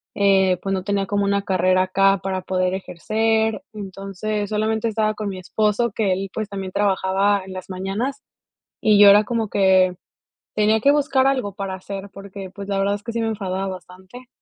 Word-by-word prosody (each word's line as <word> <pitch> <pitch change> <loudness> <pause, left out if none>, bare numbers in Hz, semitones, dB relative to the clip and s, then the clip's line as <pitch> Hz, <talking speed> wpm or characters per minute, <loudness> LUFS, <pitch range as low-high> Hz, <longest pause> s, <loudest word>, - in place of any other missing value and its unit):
eh, 190 -2 +3
pues, 195 - -3
no 190 -1 -2
tenía 200 -1 0
como 200 0 0
una 200 0 +1
carrera 185 -1 +2
acá 195 0 +2
para 190 -1 -2
poder 185 0 -1
ejercer, 220 +5 0
entonces 200 +1 -4
solamente 220 +1 0
estaba 215 -1 0
con 215 -1 -5
mi 190 -2 -5
esposo 210 +5 0
que 200 -2 0
él 195 +1 -3
pues, 215 -1 -3
también 195 -2 -6
trabajaba 195 0 +1
en 190 - -10
las 185 0 -8
mañanas 200 +9 -3 0.6
y 215 -2 +4
yo 205 0 +9
era 205 +1 +7
como 225 0 -2
que 190 -2 +3 0.6
tenía 215 +1 +3
que 280 +5 +5
buscar 280 -2 +2
algo 255 -8 0
para 195 -1 -4
hacer 195 +1 -7
porque 195 -1 -9
pues 200 +1 -9
la 200 -1 -1
verdad 200 +1 +1
es 205 - -6
que 235 - -6
sí 230 - -2
me 225 - 0
enfadaba 195 -3 -3
bastante. 190 +5 -10
200 Hz, 190 wpm, -21 LUFS, 190-215 Hz, 0.6 s, yo